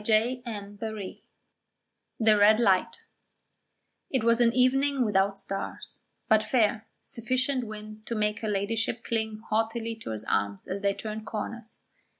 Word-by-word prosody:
CHAPTER 225 +4 +3
XXIX 205 -1 -6 1.0
THE 220 -2 +5
RED 210 +2 +6
LIGHT 195 -6 +2 1.1
It 260 -5 0
was 235 +1 +4
an 235 -1 +5
evening 260 +2 +3
without 195 -1 +2
stars, 195 - -5 0.3
but 220 -1 +5
fair, 220 -1 +1
sufficient 255 +1 -1
wind 215 0 -9
to 235 - -2
make 210 -1 0
her 220 - -3
Ladyship 225 +3 -1
cling 220 -2 -2
haughtily 225 +1 0
to 220 - -8
his 110 -1 -3
arm 100 -1 0
as 195 +1 -3
they 200 -1 +1
turned 215 0 -6
corners. 230 +1 -6
220 Hz, 140 wpm, -28 LUFS, 210-235 Hz, 1.1 s, RED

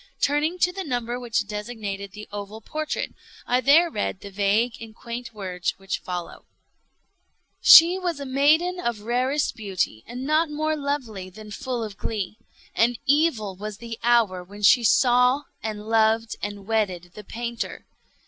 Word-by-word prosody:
Turning 300 +5 +1
to 360 0 +2
the 385 +1 -4
number 245 -4 -3
which 235 -3 -1
designated 210 -2 -5
the 210 0 -9
oval 205 +1 -6
portrait, 310 +7 -4 0.3
I 250 +1 +2
there 300 +7 +6
read 205 -2 -3
the 200 - -9
vague 205 +4 +1
and 220 -1 -10
quaint 235 +1 -7
words 185 -4 -3
which 195 0 -4
follow: 180 -1 -6 1.2
"She 345 +3 +9
was 350 -5 -2
a 280 - -5
maiden 310 +7 +3
of 235 -9 -2
rarest 250 +5 0
beauty, 190 - -2
and 250 +2 -6
not 310 +2 +2
more 310 +1 -1
lovely 265 -10 -4
than 210 +3 -12
full 245 +2 -3
of 210 -2 -7
glee. 215 0 -4 0.3
And 235 +1 +2
evil 275 - +2
was 210 +1 -6
the 230 0 -8
hour 230 -7 +3
when 205 +3 -12
she 240 +4 +6
saw, 250 +4 +4 0.2
and 215 -1 -5
loved, 225 0 +2
and 205 -1 -5
wedded 190 -5 -1
the 210 - -10
painter. 235 +3 -5
230 Hz, 160 wpm, -24 LUFS, 205-275 Hz, 1.2 s, She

